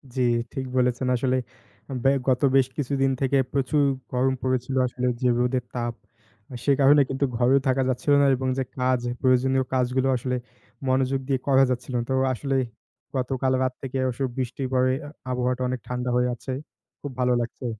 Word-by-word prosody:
জি, 130 - 0 0.3
ঠিক 135 - -3
বলেছেন 125 0 +1
আসলে। 130 +1 +1 0.7
ব্যা 135 - +5 0.2
গত 125 -1 +2
বেশ 135 -2 +5
কিছুদিন 135 -1 +1
থেকে 135 +1 +2 0.2
প্রচুর 140 +2 +2 0.3
গরম 130 +1 +2
পড়েছিল। 130 0 -1
আসলে 125 +1 -2
যে 125 - +3
রোদের 125 0 +1
তাপ, 120 -1 -2 0.7
সে 140 - +3
কারণে 145 +1 +6
কিন্তু 135 +1 0
ঘরেও 125 +3 +4
থাকা 130 0 +2
যাচ্ছিল 130 +3 +1
না - - +5
এবং 130 +1 -3
যে 135 - +1 0.2
কাজ, 125 0 +2 0.2
প্রয়োজনীয় 130 +1 +3
কাজগুলো 130 +1 +1
আসলে 125 +1 -2 0.5
মনোযোগ 130 +1 +1
দিয়ে 135 -2 +1
করা 135 -1 +5
যাচ্ছিলো 125 0 -3
না। - - -1
তো - - +1 0.2
আসলেই 135 +1 0 0.5
গতকাল 130 0 0
রাত 130 -1 0
থেকে 135 0 -4
অস 120 - -5 0.2
বৃষ্টি 130 +1 -3
পড়ে, 130 0 +3
আ - - -8 0.2
আবহাওয়াটা 125 0 -1
অনেক 130 0 -2
ঠান্ডা 125 0 -2
হয়ে 125 0 +3
আছে। 130 - -7 0.5
খুব 145 - -5
ভালো 125 0 +3
লাগছে। 120 +2 -6
130 Hz, 170 wpm, -25 LUFS, 125-135 Hz, 0.7 s, কারণে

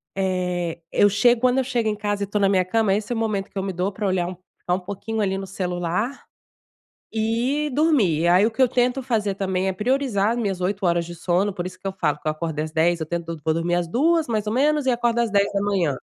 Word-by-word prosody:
eh, 180 -3 -1
eu 205 - +4
chego 235 +4 +3
quando 255 0 +3
eu 265 - +3
chego 235 -4 0
em 210 - -1
casa 205 -1 -2
e - - -3
tô 210 +1 -1
na 195 - +4
minha 190 -2 +3
cama, 200 +2 +1
esse 210 +3 -2
é - - 0
o - - -2
momento 210 -3 -1
que - - -10
eu 190 - -1
me 190 -1 -3
dou 180 +3 -1
para 205 +1 -3
olhar 185 -2 0
um 185 - -6 0.2
ficar 180 - -2
um - - -3
pouquinho 200 +4 -5
ali 195 -1 0
no 195 - -5
celular 185 +6 -2 0.9
e 235 +7 0
dormir. 220 - +2
Aí 180 +4 +5
o 230 - +1
que 260 - -2
eu 255 - +6
tento 250 +2 +1
fazer 215 -6 -1
também 190 -1 -1
é 190 - -1
priorizar 225 -2 +1
as 240 - -1
minhas 195 -5 -1
8 190 +2 -1
horas 170 -1 +2
de 175 0 -8
sono, 185 +4 0
por 180 -2 -4
isso 185 0 -8
que 195 - -5
eu 190 - -3
falo 150 -6 -1
que - - -6
eu - - +3
acordei 155 -1 -3
às 155 - -8
10h 165 0 +1
eu - - -27
tento - - -22
todo 165 -2 -6
vou 160 - +2
dormir 170 +2 0
às 175 -1 0
2h 295 - +2
mais - - -12
ou 210 - 0
menos 295 +3 +2
e 260 - +3
acordo 240 -1 +1
às 235 -3 +1
10h 200 -6 +1
200 Hz, 265 wpm, -23 LUFS, 180-230 Hz, 0.9 s, eu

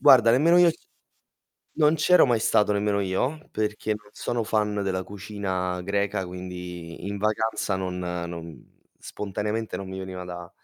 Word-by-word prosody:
Guarda 120 -3 +8
nemmeno 165 +8 +5
io 175 -1 +7 1.1
non 155 0 +5
c'ero 170 +1 +5
mai 120 -2 +3
stato 105 -1 +3
nemmeno 100 0 +1
io 100 +11 0
perché 105 0 -2
non 105 0 -18
sono 120 -2 -2
fan 105 -1 0
della 95 -1 -1
cucina 95 -2 -3
greca 100 0 -1
quindi 90 -1 -7
in 100 - -3
vacanza 110 -1 0
non 90 -1 -3
non 85 -2 -6 0.3
spontaneamente 105 +1 -3
non 95 - -6
mi 95 0 -6
veniva 95 -1 -6
da 90 -1 -8
100 Hz, 145 wpm, -26 LUFS, 90-110 Hz, 1.1 s, Guarda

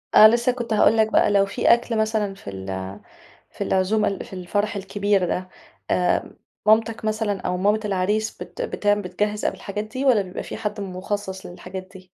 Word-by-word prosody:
آه 215 - +11
لسّه 235 +2 +3
كنت 235 -3 -3
هاقول 215 +1 +4
لك 220 0 +3
بقى، - - +4
لو 200 -1 +4
فيه 195 - +3
أكْل 235 -1 0
مثلًا 215 -2 0
في 195 - -10
ال 95 +1 -6 0.5
في - - -4
العزومة 200 +3 +1
ال 195 - -3
في - - -13
الفرح 205 +3 -2
الكبير 200 -1 0
ده، 185 0 -3 0.4
آآ 180 -1 +1 0.3
مامتك 220 +1 +3
مثلًا 215 -2 -1
أو 180 - -1
مامة 205 +3 +2
العريس 205 +3 0
بت - - -9
بتعم 205 - +1
بتجهِّز 210 +3 -2
قبل - - 0
الحاجات 205 +1 -5
دي 255 +6 -4
والّا 240 -6 +5
بيبقى 185 -1 -6
فيه - - -7
حد 210 -1 -3
مخصص 190 0 -4
للحاجات 185 +1 -8
دي. 185 -1 -13
205 Hz, 190 wpm, -23 LUFS, 185-220 Hz, 0.5 s, آه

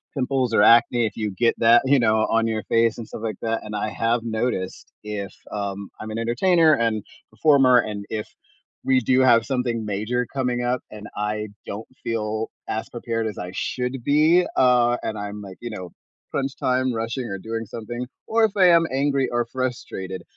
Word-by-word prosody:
pimples 130 -3 0
or 105 - +5
acne, 120 +1 +5
if 105 - -4
you 110 -2 -1
get 115 +5 +2
that, 115 +1 +6
you 140 +1 +4
know, 110 -2 +3
on 115 0 +2
your 110 -1 -2
face 115 -1 +3
and 115 - -6
stuff 110 - -8
like 110 -3 -2
that, 115 0 -1
and 105 0 -6
I 105 +1 -1
have 115 +1 0
noticed 110 -4 -3
if, 105 -2 -5 0.2
um 100 -1 -4
I'm 110 - -6
an 110 - -4
entertainer 160 +8 +3
and 110 -3 0 0.3
performer, 135 -5 +5
and 105 -3 -3
if 105 -1 -4 0.6
we 130 -1 +3
do 130 +3 +2
have 115 -3 +5
something 125 -4 -1
major 110 +5 -1
coming 125 -3 -1
up 125 0 0
and 105 0 -9
I 105 +1 -2 0.2
don't 105 +2 -6 0.2
feel 110 -1 -2 0.2
as 110 - -2
prepared 115 -2 -3
as 105 - -6
I 90 0 -5
should 125 +4 -3
be, 155 +6 +4
uh, 125 -1 +4
and 110 - -3
I'm 105 0 -6
like, 95 -2 -10
you 120 - -5
know, 90 -5 -7 0.4
crunch 135 -1 -2
time 130 0 +1
rushing 115 +3 -3
or 100 -4 -4
doing 115 +3 -5
something, 120 +3 -6 0.2
or 225 0 +4
if 215 - -1
I 185 -3 +6
am 170 -1 +5
angry 140 -1 +1
or 120 0 0
frustrated, 120 -7 -4
115 Hz, 190 wpm, -23 LUFS, 110-125 Hz, 0.6 s, that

